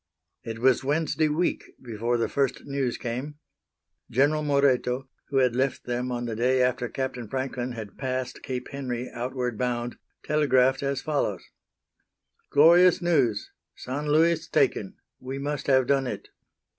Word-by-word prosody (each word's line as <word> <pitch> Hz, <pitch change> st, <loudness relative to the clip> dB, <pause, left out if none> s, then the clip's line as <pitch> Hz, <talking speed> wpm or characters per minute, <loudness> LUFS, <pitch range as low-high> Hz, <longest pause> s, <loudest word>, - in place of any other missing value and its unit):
It 115 Hz, -1 st, -5 dB
was 130 Hz, +2 st, +3 dB
Wednesday 155 Hz, +2 st, +1 dB
week 165 Hz, +4 st, 0 dB, 0.2 s
before 120 Hz, 0 st, -2 dB
the 115 Hz, -, 0 dB
first 140 Hz, -2 st, -1 dB
news 140 Hz, -3 st, -2 dB
came. 130 Hz, +5 st, -4 dB, 0.7 s
General 145 Hz, +5 st, +2 dB
Moreto, 135 Hz, -3 st, +1 dB, 0.2 s
who 140 Hz, -, -1 dB
had 125 Hz, -3 st, +3 dB
left 130 Hz, +1 st, 0 dB
them 125 Hz, +1 st, -2 dB
on 120 Hz, 0 st, -2 dB
the 115 Hz, -2 st, -3 dB
day 125 Hz, +3 st, +2 dB
after 125 Hz, -1 st, +1 dB
Captain 130 Hz, -3 st, -4 dB
Franklin 130 Hz, -1 st, -3 dB
had 110 Hz, -3 st, -8 dB
passed 130 Hz, -1 st, -3 dB
Cape 125 Hz, -1 st, -5 dB
Henry 125 Hz, -3 st, -4 dB
outward 125 Hz, -1 st, -3 dB
bound, 120 Hz, -1 st, -2 dB, 0.2 s
telegraphed 135 Hz, -3 st, +3 dB
as 140 Hz, -1 st, -2 dB
follows: 150 Hz, -2 st, -1 dB, 1.1 s
Glorious 170 Hz, +4 st, +6 dB
news; 140 Hz, -, +1 dB, 0.2 s
San 145 Hz, +4 st, -5 dB
Luis 160 Hz, +2 st, +3 dB
taken. 110 Hz, -, +1 dB, 0.2 s
We 130 Hz, +1 st, -6 dB
must 145 Hz, +1 st, -3 dB
have 130 Hz, -2 st, +4 dB
done 135 Hz, 0 st, +2 dB
it. -, -, -6 dB
130 Hz, 145 wpm, -26 LUFS, 125-140 Hz, 1.1 s, Glorious